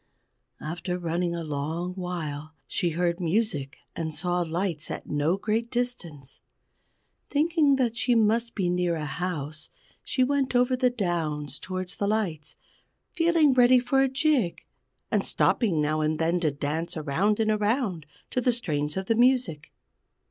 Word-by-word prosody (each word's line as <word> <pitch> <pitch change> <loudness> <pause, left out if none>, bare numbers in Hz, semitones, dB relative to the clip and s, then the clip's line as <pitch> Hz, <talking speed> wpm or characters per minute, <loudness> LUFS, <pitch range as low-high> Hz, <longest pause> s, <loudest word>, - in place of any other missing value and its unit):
After 175 +3 -4
running 170 0 -1
a 170 - -4
long 160 +4 -3
while, 160 -5 -5
she 175 - -1
heard 170 +1 0
music 170 -6 -1 0.2
and 160 -1 -3
saw 175 +3 0
lights 170 -1 -2
at - - -5
no 150 +5 0
great 220 +3 -1
distance. 175 - -4 0.9
Thinking 300 -1 +3
that 245 -4 0
she 245 0 +2
must 230 +1 +2
be 190 -4 0
near 175 -1 +1
a 155 -2 -3
house, 155 -1 -4 0.3
she 255 - +1
went 270 -1 0
over 250 +1 +3
the 255 0 +3
downs 160 - -2
toward 185 -1 -5
the 200 +1 -2
lights, 185 -8 -2 0.6
feeling 330 -4 +4
ready 250 0 +6
for 270 +2 +2
a 270 - +3
jig, 270 - +1 0.5
and - - +2
stopping 195 -10 +2
now 155 +1 +1
and 155 0 0
then 165 +2 +1
to 160 -3 +2
dance 150 +4 -3
around 165 +9 +1
and 220 -1 +2
around 210 - 0 0.2
to 250 - 0
the 250 - +3
strains 150 -9 -2
of 190 - -2
the 225 - +2
music. 240 - +2
180 Hz, 155 wpm, -27 LUFS, 160-240 Hz, 0.9 s, ready